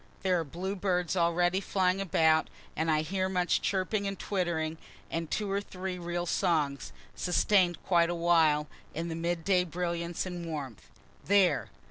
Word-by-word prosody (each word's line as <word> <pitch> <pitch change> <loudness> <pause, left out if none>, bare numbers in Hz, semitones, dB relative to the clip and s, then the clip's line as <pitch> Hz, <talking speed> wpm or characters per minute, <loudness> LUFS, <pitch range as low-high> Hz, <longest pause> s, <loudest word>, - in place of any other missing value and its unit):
There 185 -2 +2
are - - -1
bluebirds 180 +2 -2
already 175 +2 +2
flying 190 -1 +1
about, 160 -4 +3 0.3
and 160 +1 0
I 155 -1 +3
hear 185 +4 -1
much 180 -1 +1
chirping 200 +1 0
and 195 0 -3
twittering 165 -5 -2 0.3
and 165 -1 -3
two 210 -2 -2
or 200 +1 0
three 185 -2 -6
real 175 0 -3
songs, 150 -5 0 0.2
sustain'd 180 -1 +2
quite 170 -2 +3
awhile, 165 -3 +3 0.3
in 165 +2 -3
the 160 - -3
mid 170 0 -2
day 185 -2 +4
brilliance 170 0 -3
and 180 -2 -5
warmth. 145 - -6 0.4
(There! 200 -1 +3
175 Hz, 150 wpm, -30 LUFS, 165-185 Hz, 0.4 s, day